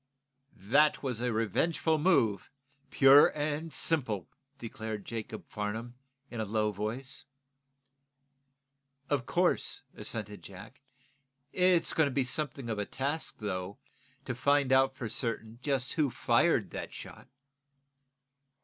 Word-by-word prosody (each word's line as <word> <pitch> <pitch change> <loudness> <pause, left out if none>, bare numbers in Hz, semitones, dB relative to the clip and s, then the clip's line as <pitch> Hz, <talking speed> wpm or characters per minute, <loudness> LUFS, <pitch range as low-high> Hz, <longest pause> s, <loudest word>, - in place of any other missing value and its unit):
"That 140 +12 +2
was 125 -4 -2
a 125 0 0
revengeful 155 +8 +1
move, 115 - +2 0.4
pure 135 +1 +7
and 150 +2 -2
simple," 125 - +1 0.3
declared 110 -4 -6
Jacob 115 -2 -6
Farnum, 110 +3 -4 0.4
in 120 - -5
a - - 0
low 105 0 0
voice. 115 +8 -4 1.9
"Of 135 -4 0
course," 180 -5 +1
assented 105 -1 -5
Jack. 100 +8 -12 0.7
"It's 180 -2 +3
going 160 -2 +3
to - - -3
be 130 0 +1
something 140 -2 -3
of 110 -2 -2
a 105 - -1
task 140 +4 -2
though, 100 -1 -4 0.5
to 125 - -3
find 140 +1 +2
out, 135 0 +4
for 120 - -5
certain, 115 0 -3
just 135 -2 0
who 150 -4 +1
fired - - +2
that - - -6
shot." - - -10
125 Hz, 120 wpm, -30 LUFS, 110-145 Hz, 1.9 s, pure